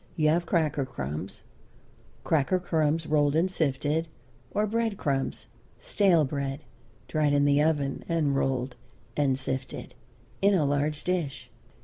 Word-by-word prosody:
You 155 -1 +3
have 170 +2 +1
cracker 155 -5 +1
crumbs 75 - -5 0.8
cracker 160 +4 +2
crumbs 160 -3 0
rolled 150 -1 +2
and 175 +4 +2
sifted 155 0 0 0.4
or 210 - +1
bread 225 -1 -1
crumbs, 135 -5 -1 0.3
stale 175 -6 +3
bread, 140 0 -3 0.5
dried 150 -2 +1
in 145 0 +4
the 145 0 +4
oven 145 -3 0
and 155 -4 +1
rolled 130 -2 0 0.4
and 135 -3 +2
sifted, 130 -1 -4 0.5
in 200 0 +5
a 160 -5 +2
large 145 +2 0
dish. 170 -7 -2
150 Hz, 130 wpm, -28 LUFS, 140-165 Hz, 0.8 s, in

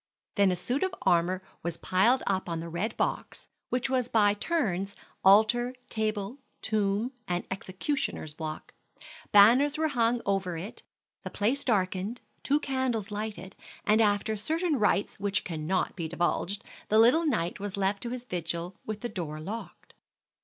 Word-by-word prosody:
Then 200 -2 +4
a - - +1
suit 245 +10 -1
of 375 0 0
armor 180 +2 +2 0.2
was 170 0 -2
piled 230 +8 +3
up 190 -2 -1
on 165 -1 -2
the 165 +1 -6
red 190 +7 -3
box, - - -3 0.2
which 250 0 0
was 255 -2 +1
by 205 -2 +4
turns 200 - -1 0.3
altar, 220 +6 +5 0.2
table, 215 +2 -2 0.2
tomb, 215 +2 0 0.2
and 175 0 -1
executioner's 190 - -3
block. 155 -1 -6 0.6
Banners 245 +9 +6
were 315 0 +1
hung 240 -3 +2
over 195 -3 0
it, 190 +7 -7 0.4
the - - -6
place 245 +8 0
darkened, 200 0 0 0.2
two 290 +2 +2
candles 260 -7 -1
lighted, 205 -2 -5 0.3
and 215 +1 +4
after 210 +1 +2
certain 315 - 0
rites 205 -2 +1
which 200 0 0
cannot 165 +2 -1
be 170 -3 -3
divulged, 175 +3 -1 0.3
the 215 - +4
little 255 +9 +5
knight 170 - 0
was 200 0 -4
left 195 +1 0
to 240 - -4
his 250 0 -5
vigil 175 -2 -4
with 215 -1 -5
the 240 - -2
door 165 -8 -5
locked. 210 +9 -8
205 Hz, 155 wpm, -29 LUFS, 185-240 Hz, 0.6 s, Banners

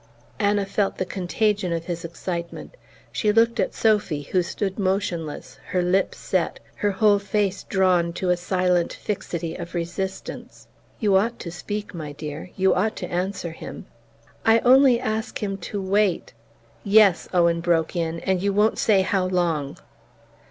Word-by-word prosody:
Anna 205 -1 +2
felt 195 0 -1
the 185 - -1
contagion 190 +1 -1
of 165 0 -2
his 170 -2 -4
excitement. 170 - -6 0.4
She 210 - +1
looked 230 +2 +3
at - - 0
Sophy, 205 -9 +1
who 180 +6 +1
stood 195 +3 -3
motionless, 185 -5 -2
her 180 +1 0
lips 185 +2 +1
set, - - -1 0.2
her 205 - +1
whole 205 +1 +3
face 200 -1 -1
drawn 185 -3 +2
to 180 +1 0
a - - +4
silent 180 -1 +1
fixity 170 -5 -4
of 170 0 -7
resistance. 180 +3 -5 0.3
"You 205 -4 +3
ought 230 +4 0
to 170 - -6
speak, 205 +4 -5
my 155 -4 -6
dear 150 +3 -7
you 190 -1 +3
ought 215 +4 0
to 180 - -6
answer 180 -1 -2
him." 160 - -9 0.6
"I 225 0 +5
only 255 -1 +6
ask 220 -1 -3
him 195 -1 -2
to 205 - -3
wait 195 0 +1 0.3
" - - -32
"Yes," 200 -3 +4
Owen, 170 -2 +3
broke 170 0 +1
in, 165 -1 -2
"and 190 -1 0
you 200 +1 +1
won't 210 +2 +2
say 200 -4 +4
how 190 -1 +1
long!" 170 -6 -1
190 Hz, 160 wpm, -24 LUFS, 170-205 Hz, 0.6 s, only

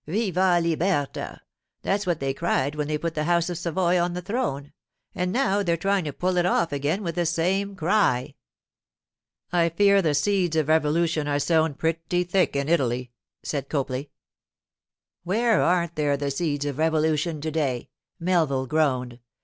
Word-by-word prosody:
"Viva 185 -1 +2
libertà!" 165 -2 -1 0.4
That's 200 0 -1
what 170 -3 0
they 135 0 -1
cried 135 +1 0
when 150 -1 -3
they 155 0 -1
put 165 +1 -3
the 150 -1 -2
House 175 +1 +1
of 175 - -4
Savoy 175 +1 +1
on 175 0 0
the 180 - -4
throne, 175 - -3 0.4
and 180 0 -1
now 205 -4 +1
they're 170 -4 0
trying 195 +1 0
to 150 - -2
pull 180 +5 -1
it 175 - +3
off 170 -3 +1
again 145 +8 -1
with 170 -2 -2
the 175 +1 0
same 190 +4 0
cry.' 175 -8 +1 1.2
'I 170 -1 +3
fear 200 +3 +4
the 155 -5 +1
seeds 180 +2 +1
of 155 -2 +1
revolution 160 0 +2
are 145 -1 +1
sown 160 0 +1
pretty 165 +3 -1
thick 180 -3 +1
in 140 0 -1
Italy,' 125 -6 0 0.3
said 140 -2 -4
Copley. 135 -1 -2 1.1
'Where 220 +5 +2
aren't 170 -1 +1
there 145 -2 +1
the 140 0 -2
seeds 145 -1 -2
of 145 0 -4
revolution 160 0 +1
to 155 +2 -3
day?' 140 -6 -2 0.3
Melville 165 -7 +1
groaned. 130 -4 0
165 Hz, 165 wpm, -25 LUFS, 145-180 Hz, 1.2 s, fear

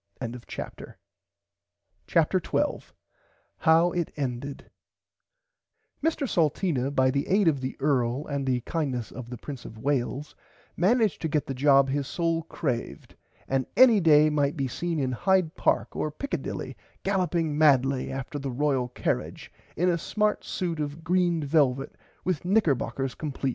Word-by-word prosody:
[Pg 115 -3 -4
102] 125 -1 -8 1.1
CHAPTER - - +3
12 - - -2 0.6
HOW 165 +2 +4
IT 175 -2 -2
ENDED 135 0 -4 1.3
Mr 315 -3 0
Salteena 155 - +1
by 130 -2 +2
the 140 +1 -1
aid 195 -1 +3
of 140 -5 +2
the 130 - -4
earl 135 -1 +1
and 140 -2 -3
the 125 -1 +1
kindness 130 - -3
of 125 -2 -8
the 125 - -6
Prince 135 0 -8
of 110 - -10
Wales 140 +3 -2 0.4
managed 215 +3 +2
to 160 - 0
get 150 -1 0
the 135 - -4
job 135 +1 +4
his 140 0 -1
soul 165 -1 0
craved 140 -6 -4 0.3
and 135 -1 0
any 245 -5 +7
day 155 -3 +5
might 145 +1 +1
be 135 -2 0
seen 170 +5 -2
in 130 -2 0
Hyde 185 +4 +2
park - - 0
or 155 - -1
Pickadilly 280 - -4 0.3
galloping 175 -5 0
madly 135 -3 +3
after 135 +2 -5
the 140 -1 -4
Royal 135 -1 0
Carrage 125 - -3 0.2
in 180 - +2
a 170 -2 +2
smart 210 +5 0
suit 170 -3 -3
of 150 +2 -4
green 175 -1 +1
velvit 135 -3 +1 0.3
with 180 -5 -1
knickerbockers 140 - +1
compleat. 140 -3 -3
145 Hz, 150 wpm, -27 LUFS, 135-170 Hz, 1.3 s, any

